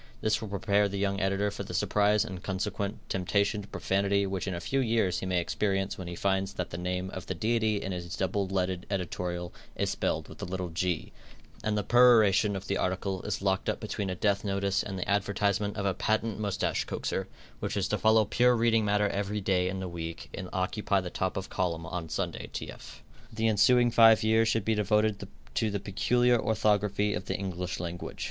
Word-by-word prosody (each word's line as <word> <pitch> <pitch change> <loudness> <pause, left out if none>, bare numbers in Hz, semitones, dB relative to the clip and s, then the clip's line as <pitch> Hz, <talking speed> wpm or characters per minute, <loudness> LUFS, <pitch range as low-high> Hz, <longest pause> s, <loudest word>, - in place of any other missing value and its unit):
This 110 +1 +1
will 110 - -4
prepare 100 0 +2
the 100 - -4
young 100 0 0
editor 100 +1 +1
for - - -6
the - - -6
surprise 105 +1 +2
and 95 -5 -7
consequent 100 +2 -3
temptation 100 +3 0
to 100 - -11
profanity 100 +1 +1
which 95 0 -3
in 95 - -2
a - - -3
few 135 +10 -1
years 115 -7 +1
he 95 - -4
may 90 -1 +1
experience 95 +2 -1
when 95 - -7
he 85 - -5
finds 95 +1 0
that 90 - -4
the 85 - -4
name 90 +1 -2
of 95 - -7
the 95 - -3
Deity 110 +2 +1
in 95 - -4
his 90 -1 -5
double 95 +1 0
leaded 95 -1 -2
editorial 90 -2 -3 0.2
is - - 0
spelled - - -1
with - - -12
a - - -3
little 90 0 -4
"g," 85 +1 -2 0.5
and 105 -1 0
the 105 - 0
peroration 110 -3 +5
of 95 0 -5
the 100 - -1
article 95 0 -1
is 100 -2 -3
locked 95 -1 +1
up - - -1
between 100 - -3
a 90 - -2
death 100 +1 +1
notice 100 -1 0
and 95 -2 -5
the 90 - -3
advertisement 100 +1 0
of 100 - -2
a 95 - +2
patent 110 +3 -1
moustache 100 -2 -1
coaxer, 95 0 -3 0.3
which - - -3
is - - +1
to - - 0
follow 110 0 +5
pure 125 +4 +3
reading 115 -1 +3
matter 105 0 +2
every 100 +1 -2
day 95 -2 +1
in 95 0 -4
the 95 - -4
week 85 -1 -6
and 95 -2 -6
occupy 100 +2 0
the 90 -2 -5
top 95 0 -2
of 95 - -3
column 85 -4 -1
on 85 -1 -5
Sunday - - -3
tf. - - -8 0.3
The 110 0 0
ensuing 120 +3 +4
five 115 -1 +7
years 110 +1 +4
should 110 -2 +1
be 110 - +2
devoted 105 0 +1 0.3
to 110 +9 +1
the 100 0 -2
peculiar 120 +5 +2
orthography 105 -1 +1
of 95 - -4
the - - -2
English 90 -2 -4
language. 85 0 -6
100 Hz, 210 wpm, -29 LUFS, 95-105 Hz, 0.5 s, five